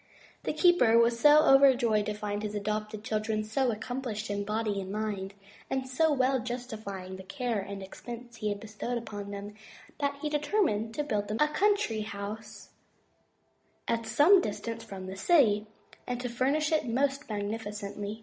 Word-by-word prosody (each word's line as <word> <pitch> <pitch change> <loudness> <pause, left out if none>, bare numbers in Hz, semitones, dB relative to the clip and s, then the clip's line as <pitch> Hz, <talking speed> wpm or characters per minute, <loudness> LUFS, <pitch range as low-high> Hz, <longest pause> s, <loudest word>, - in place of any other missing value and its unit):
The - - +1
keeper 310 -9 +5
was 235 0 +4
so 295 +4 +7
overjoyed 255 -6 +5
to 210 - -2
find 210 0 -3
his 210 -1 -4
adopted 215 +1 -3
children 215 0 -1
so 245 +4 0
accomplished 225 -1 -4
in 205 0 -1
body 210 -1 -1
and 190 0 -6
mind, 200 -2 -3 0.3
and 265 0 -1
so 310 +5 +2
well 265 -1 +2
justifying 220 -6 -6
the 190 - -9
care 235 +2 -2
and 195 0 -6
expense 240 +4 -9
he 215 -1 -1
had 205 -1 -3
bestowed 220 +3 -4
upon 205 -3 -6
them, 200 +1 -6 0.5
that 280 -1 -1
he - - +1
determined 295 - 0
to 295 - 0
build 210 -8 -1
them 215 - -2
a 300 - +4
country 390 - +1
house 210 +1 -7 1.2
at 230 -1 -1
some 305 - +6
distance 230 - -4
from 195 -4 -8
the 190 +1 -6
city, 215 - +3 0.4
and 245 -1 -2
to 250 - -3
furnish 275 +6 +1
it 310 -5 +1
most 275 +4 0
magnificently. 205 0 -4
220 Hz, 165 wpm, -29 LUFS, 205-260 Hz, 1.2 s, so